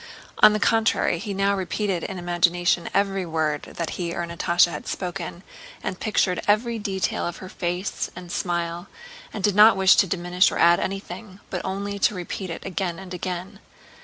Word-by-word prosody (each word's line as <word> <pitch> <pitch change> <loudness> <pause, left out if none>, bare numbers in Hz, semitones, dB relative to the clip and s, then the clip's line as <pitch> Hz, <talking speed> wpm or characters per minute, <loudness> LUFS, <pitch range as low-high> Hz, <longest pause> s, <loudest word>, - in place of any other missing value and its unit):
On - - +9
the 215 - 0
contrary, 225 -6 +2
he 205 - -5
now 200 +1 +1
repeated 190 -1 -2
in 190 - -5
imagination 175 0 +1
every 195 -1 +1
word 160 -3 -1 0.2
that 170 -2 -2
he 170 -1 -3
or 175 - -2
Natásha 170 +1 +2
had 150 - -7
spoken 175 -1 -5 0.4
and 185 - -4
pictured 190 -4 +1
every 225 +2 +2
detail 190 -4 -1
of 175 - -5
her 185 - -9
face 180 +2 -3
and 175 -1 -9
smile, 175 0 -2 0.4
and 205 - -6
did 205 - +3
not 210 +1 +7
wish 190 0 +6
to 195 - +5
diminish 180 +1 +2
or - - -3
add 170 +1 +5
anything, 195 +1 -5
but - - -2
only 200 +1 -3
to 205 - +2
repeat 185 +1 -5
it 165 - -7
again 180 -2 -2
and 190 -1 -9
again. 185 +2 -5
185 Hz, 180 wpm, -24 LUFS, 175-200 Hz, 0.4 s, On